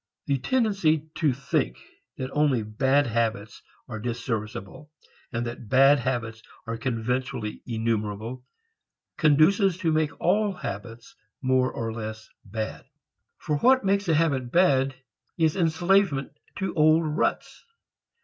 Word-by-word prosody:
The 140 -2 0
tendency 165 - +1
to 155 -3 +2
think 125 - -1 0.4
that 130 0 -4
only 145 -6 +2
"bad" 130 +7 +2
habits 115 -3 -2 0.3
are 110 - -6
disserviceable 115 +1 -5 0.4
and 120 -1 -2
that 120 -2 -7
bad 135 +3 +6
habits 115 -4 -3 0.2
are 115 0 -3
conventionally 115 -1 -3
enumerable, 115 +1 -2 0.7
conduces 170 +5 +4
to 170 -4 0
make 155 0 0
all 205 +2 +2
habits 115 - -7 0.3
more 130 0 +2
or 115 -1 -4
less 110 -1 -6 0.2
bad. 110 +2 -5 0.5
For 150 - -2
what 260 - +4
makes 200 0 +1
a 165 - +3
habit 140 -6 +1
bad 135 -6 +3 0.4
is 160 -2 +2
enslavement 175 -3 +2 0.2
to 190 0 -3
old 155 0 +4
ruts. 150 0 -2
135 Hz, 120 wpm, -26 LUFS, 115-160 Hz, 0.7 s, bad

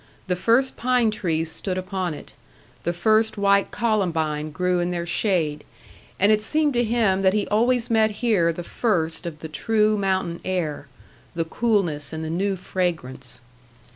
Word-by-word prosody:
The 180 - 0
first 235 +8 +2
pine 245 -2 +2
trees 165 -6 -1
stood 185 +3 -3
upon 185 -3 -3
it; - - -12 0.5
the 170 - -1
first 220 +5 +2
white 200 0 +3
columbine 160 -9 0
grew 180 +3 0
in 175 0 0
their 175 -1 -2
shade; 170 -4 0 0.6
and 200 +3 +5
it 215 0 +3
seemed 300 +6 +1
to 240 0 +2
him 220 -5 +1
that 190 -1 +3
he 210 - +1
always 235 +3 +2
met 220 -1 +4 0.2
here 180 -8 +3
the 175 +1 -6
first 170 -5 -1
of 160 -3 -6
the 160 - -5
true 215 +5 +1
mountain 190 -3 -1
air 160 -6 -2 0.5
the 165 -1 -1
coolness 175 -8 0
and 160 0 -4
the 160 - -3
new 195 +3 0
fragrance. 160 -10 -4
185 Hz, 165 wpm, -23 LUFS, 165-215 Hz, 0.6 s, and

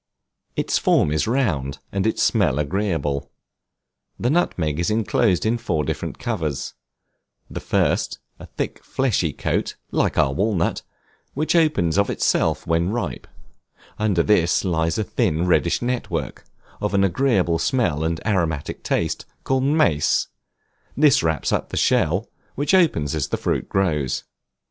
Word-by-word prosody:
Its - - 0
form - - +3
is 80 +5 0
round, 85 - 0
and 100 +2 0
its 110 - +1
smell 90 - +2
agreeable. 75 -4 -1 0.9
The 120 - +1
nutmeg 85 - 0
is 85 - 0
inclosed 110 -2 +1
in 115 +2 +1
four 80 -10 -1
different - - -4
covers; 80 - -3 0.8
the - - -4
first, - - 0 0.2
a - - -10
thick - - -5
fleshy 110 - 0
coat, - - -2 0.2
(like - - 0
our 65 - +3
walnut,) 95 +1 0 0.5
which 155 +5 0
opens 125 - +2
of 100 - +2
itself - - +1
when 85 +2 +1
ripe; 105 - -3 0.7
under 100 -5 +2
this 90 -2 +2
lies 80 0 0
a 110 - 0
thin 85 -3 0
reddish 85 +3 +2
network, 125 0 -3 0.4
of 105 -1 -1
an 100 - +3
agreeable 95 -4 +2
smell 85 - 0
and 80 0 -1
aromatic 85 -8 -1
taste, 80 - -1 0.2
called 130 0 +1
mace; 140 - +2 0.7
this 145 -2 +5
wraps 80 -2 0
up - - -1
the - - -5
shell, 90 +8 +2 0.3
which 145 +6 0
opens 150 - +3
as 75 -3 -1
the - - -2
fruit - - -2
grows. 80 -9 0
90 Hz, 140 wpm, -22 LUFS, 80-115 Hz, 0.9 s, this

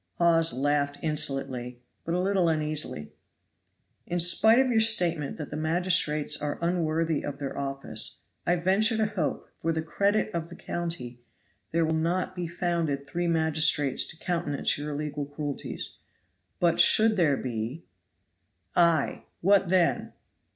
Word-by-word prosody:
Hawes 165 -1 +4
laughed 145 +1 0
insolently, 135 -5 -2 0.3
but 170 - -1
a - - +1
little 185 -2 +2
uneasily. 155 - -2 1.0
"In 175 - -1
spite 220 +7 +4
of 260 -1 +3
your 225 - +3
statement 175 -10 +2
that 150 -3 -7
the - - -4
magistrates 155 -2 +1
are 145 0 -2
unworthy 165 -2 0
of 145 -1 -5
their 140 -1 -5
office, 135 0 -3 0.2
I 175 - +2
venture 195 +6 +3
to 220 - +2
hope, 200 -8 -3
for 165 - 0
the 160 -1 -2
credit 200 +6 0
of 170 -1 -3
the 175 - -10
county, 140 -9 -5 0.5
there 165 0 +2
will 160 - 0
not 175 +4 -1
be 175 -2 -3
found 170 -1 -1 0.2
three 175 +5 -2
magistrates 155 -4 +2
to 160 - -8
countenance 165 -5 0
your 145 +1 -5
illegal 145 -1 -4
cruelties. 145 -1 -6 0.6
But 170 -1 +2
should 220 0 +6
there 155 -8 +2
be 120 +6 -4 0.5
" - - -43
"Ay; 170 -4 +2 0.2
what 195 0 +4
then?" 180 -2 +1
165 Hz, 145 wpm, -27 LUFS, 145-175 Hz, 1.0 s, should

